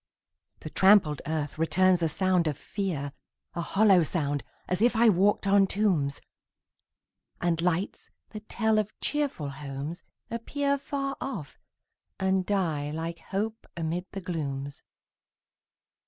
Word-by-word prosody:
The -, -, -7 dB
trampled 190 Hz, -7 st, +5 dB
earth 155 Hz, -1 st, -2 dB
returns 185 Hz, +2 st, +3 dB
a 165 Hz, -, +2 dB
sound 185 Hz, 0 st, +2 dB
of 150 Hz, -3 st, -1 dB
fear 155 Hz, -9 st, -3 dB, 0.4 s
A 170 Hz, -, -2 dB
hollow 195 Hz, +1 st, +4 dB
sound, 145 Hz, -3 st, -1 dB, 0.2 s
as 180 Hz, +2 st, -1 dB
if 240 Hz, +1 st, +4 dB
I 230 Hz, +1 st, +6 dB
walked 200 Hz, +2 st, +3 dB
on 195 Hz, 0 st, +5 dB
tombs! 175 Hz, -10 st, +1 dB, 1.2 s
And 170 Hz, -1 st, +1 dB
lights, 180 Hz, +2 st, -1 dB, 0.2 s
that 215 Hz, 0 st, -9 dB
tell 220 Hz, -2 st, +2 dB
of 210 Hz, 0 st, -4 dB
cheerful 285 Hz, -, -1 dB
homes, 140 Hz, +4 st, -6 dB, 0.3 s
appear 280 Hz, +4 st, -1 dB
Far 275 Hz, 0 st, -3 dB
off, 195 Hz, -, -5 dB, 0.6 s
and 190 Hz, -1 st, +1 dB
die 165 Hz, -8 st, 0 dB
like 165 Hz, +2 st, -4 dB
hope 215 Hz, +3 st, -4 dB
amid 170 Hz, +3 st, -2 dB
the 195 Hz, -, -5 dB
glooms. 140 Hz, -6 st, -4 dB
180 Hz, 125 wpm, -28 LUFS, 155-210 Hz, 1.2 s, I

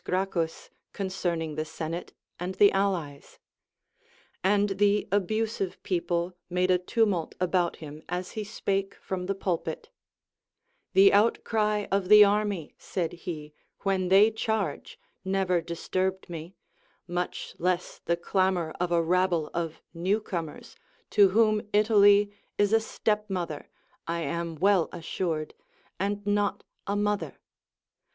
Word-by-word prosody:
Gracchus 180 Hz, -3 st, -2 dB, 0.2 s
con 195 Hz, -1 st, -3 dB
cerning 170 Hz, -4 st, -2 dB
the 155 Hz, -, -1 dB
senate 160 Hz, +2 st, -5 dB, 0.3 s
and 180 Hz, +2 st, -4 dB
the 205 Hz, 0 st, +6 dB
allies; 180 Hz, -8 st, -2 dB, 1.1 s
and 205 Hz, +2 st, +3 dB
the 205 Hz, 0 st, +3 dB
abusive 205 Hz, 0 st, -1 dB
people 175 Hz, 0 st, -1 dB
made 180 Hz, +1 st, +1 dB
a 180 Hz, -, +4 dB
tumult 185 Hz, -2 st, 0 dB
about 180 Hz, -1 st, +1 dB
him 150 Hz, -1 st, -10 dB
as 180 Hz, +1 st, -3 dB
he 215 Hz, -, -4 dB
spake 195 Hz, -2 st, -2 dB
from 180 Hz, -1 st, -5 dB
the 195 Hz, -, -1 dB
pulpit; 185 Hz, -, -3 dB, 1.0 s
The 195 Hz, +1 st, +7 dB
outcry 210 Hz, 0 st, +2 dB
of 195 Hz, -1 st, 0 dB
the 210 Hz, 0 st, +10 dB
army, 205 Hz, -5 st, 0 dB
said 175 Hz, -3 st, -3 dB
he, 155 Hz, -3 st, -7 dB, 0.3 s
when 190 Hz, -2 st, 0 dB
they 200 Hz, +4 st, +6 dB
charge, 220 Hz, -7 st, -3 dB, 0.2 s
never 190 Hz, -2 st, +1 dB
disturbed 185 Hz, +3 st, -2 dB
me, 170 Hz, +1 st, -8 dB, 0.5 s
much 175 Hz, 0 st, -3 dB
less 180 Hz, +1 st, -1 dB
the 170 Hz, -, 0 dB
clamor 180 Hz, -2 st, 0 dB
of 180 Hz, 0 st, -1 dB
a 170 Hz, -1 st, +3 dB
rabble 175 Hz, -2 st, +1 dB
of 165 Hz, -2 st, -4 dB
new 185 Hz, +6 st, +1 dB
comers, 170 Hz, -7 st, -6 dB, 0.4 s
to 200 Hz, -2 st, +6 dB
whom 215 Hz, +1 st, +3 dB
Italy 205 Hz, -1 st, +5 dB, 0.3 s
is 205 Hz, +1 st, +2 dB
a 225 Hz, -, +6 dB
step 215 Hz, -1 st, -1 dB
mother 175 Hz, -6 st, -4 dB, 0.4 s
(I 170 Hz, 0 st, -1 dB
am 170 Hz, 0 st, -3 dB
well 190 Hz, 0 st, +3 dB
assured) 165 Hz, -2 st, -3 dB, 0.5 s
and 200 Hz, +1 st, -2 dB
not 205 Hz, 0 st, 0 dB, 0.2 s
a 200 Hz, -, 0 dB
mother. 205 Hz, 0 st, -1 dB
185 Hz, 130 wpm, -28 LUFS, 170-205 Hz, 1.1 s, the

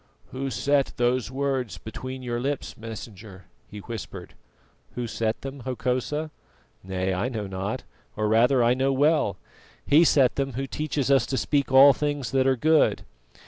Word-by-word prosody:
"Who 135 Hz, +1 st, -3 dB
set 140 Hz, +3 st, +1 dB
those 120 Hz, -2 st, +1 dB
words 130 Hz, -5 st, -2 dB
between 130 Hz, +4 st, -7 dB
your 120 Hz, -1 st, -2 dB
lips, 140 Hz, +2 st, -3 dB
Messenger?" 105 Hz, -4 st, -10 dB, 0.2 s
he 105 Hz, -, -11 dB
whispered. 115 Hz, -1 st, -8 dB, 0.6 s
"Who 125 Hz, -, -3 dB
set 115 Hz, -1 st, -2 dB
them, 135 Hz, +1 st, -7 dB
Hokosa? 130 Hz, +5 st, -2 dB, 0.5 s
Nay, 95 Hz, 0 st, -2 dB
I 100 Hz, +7 st, -1 dB
know 110 Hz, -5 st, -4 dB
not 100 Hz, +6 st, -4 dB, 0.3 s
or 105 Hz, 0 st, 0 dB
rather, 120 Hz, +4 st, +4 dB
I 120 Hz, +1 st, +4 dB
know 135 Hz, +2 st, +1 dB
well. 140 Hz, -, +2 dB, 0.5 s
He 155 Hz, +4 st, +6 dB
set 135 Hz, -6 st, +3 dB
them 135 Hz, -1 st, -1 dB
Who 135 Hz, +3 st, -3 dB
teaches 140 Hz, -1 st, -2 dB
us 135 Hz, -, +4 dB
to 130 Hz, -, -2 dB
speak 140 Hz, -1 st, 0 dB
all 135 Hz, +1 st, +8 dB
things 145 Hz, -2 st, -2 dB
that 135 Hz, 0 st, +2 dB
are 135 Hz, -, +3 dB
good." 155 Hz, +4 st, +3 dB
130 Hz, 160 wpm, -25 LUFS, 115-140 Hz, 0.6 s, all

